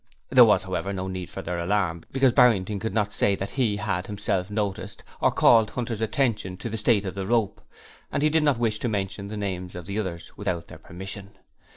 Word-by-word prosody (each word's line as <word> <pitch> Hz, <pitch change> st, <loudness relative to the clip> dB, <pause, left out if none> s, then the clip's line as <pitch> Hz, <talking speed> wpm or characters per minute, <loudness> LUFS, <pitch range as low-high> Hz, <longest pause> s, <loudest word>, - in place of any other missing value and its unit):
There -, -, +8 dB
was, -, -, +3 dB
however, 100 Hz, -, -3 dB
no 95 Hz, -1 st, -3 dB
need 95 Hz, -1 st, -5 dB
for -, -, -7 dB
their 90 Hz, 0 st, -3 dB
alarm, 85 Hz, -2 st, 0 dB
because 135 Hz, -2 st, +3 dB
Barrington 105 Hz, -5 st, +4 dB
could 110 Hz, +3 st, -3 dB
not 105 Hz, -1 st, 0 dB
say 100 Hz, -1 st, +2 dB
that 95 Hz, +1 st, -5 dB
he 115 Hz, -6 st, 0 dB
had 95 Hz, -3 st, -2 dB
himself 100 Hz, -2 st, -2 dB
noticed, 105 Hz, -2 st, -3 dB, 0.2 s
or -, -, +5 dB
called 110 Hz, -3 st, +5 dB
Hunter's 115 Hz, -2 st, -4 dB
attention 110 Hz, -5 st, 0 dB
to 115 Hz, -, -5 dB
the 110 Hz, -, -3 dB
state 110 Hz, -2 st, +2 dB
of 95 Hz, -, -3 dB
the 95 Hz, -1 st, -4 dB
rope; 110 Hz, -3 st, 0 dB, 0.5 s
and 140 Hz, -, -1 dB
he 155 Hz, -, +4 dB
did 160 Hz, +1 st, +3 dB
not 145 Hz, -4 st, +3 dB
wish 110 Hz, -2 st, 0 dB
to 120 Hz, -, -1 dB
mention 100 Hz, -1 st, -3 dB
the 105 Hz, +1 st, -6 dB
names 95 Hz, -3 st, -4 dB
of 90 Hz, -1 st, -7 dB
the 100 Hz, +3 st, -3 dB
others 85 Hz, -5 st, -5 dB
without 90 Hz, -5 st, -3 dB
their -, -, -12 dB
permission. 95 Hz, +2 st, -9 dB
100 Hz, 220 wpm, -25 LUFS, 95-110 Hz, 0.5 s, There